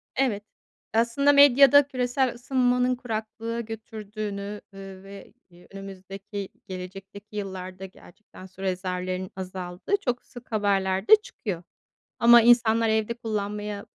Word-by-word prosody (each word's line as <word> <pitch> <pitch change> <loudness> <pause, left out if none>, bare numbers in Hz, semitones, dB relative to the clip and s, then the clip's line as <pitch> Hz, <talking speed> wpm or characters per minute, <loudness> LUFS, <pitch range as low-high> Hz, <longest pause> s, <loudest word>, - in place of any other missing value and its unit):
Evet. 235 -6 0 0.5
Aslında 235 +6 +3
medyada 280 0 +7
küresel 255 -1 0
ısınmanın 250 0 +1
kuraklığa 230 -1 -5
götürdüğünü, 210 -2 -6
eee, 195 -1 -10
ve 195 +1 -12 0.4
önümüzdeki 195 +1 -8 0.2
gelecekteki 195 +3 -9
yıllarda, 190 -1 -6
gerçekten 190 0 -15
su 190 0 -14
rezervlerin 185 0 -3
azaldığı 185 - -3
çok 245 -1 -1
sık 245 0 -14
haberlerde 195 - +4
çıkıyor 200 - -6 0.6
ama 235 0 +8
insanlar 230 -1 +4
evde 220 +1 +1
kullanmaya 210 -2 -4
210 Hz, 105 wpm, -26 LUFS, 195-235 Hz, 0.6 s, ama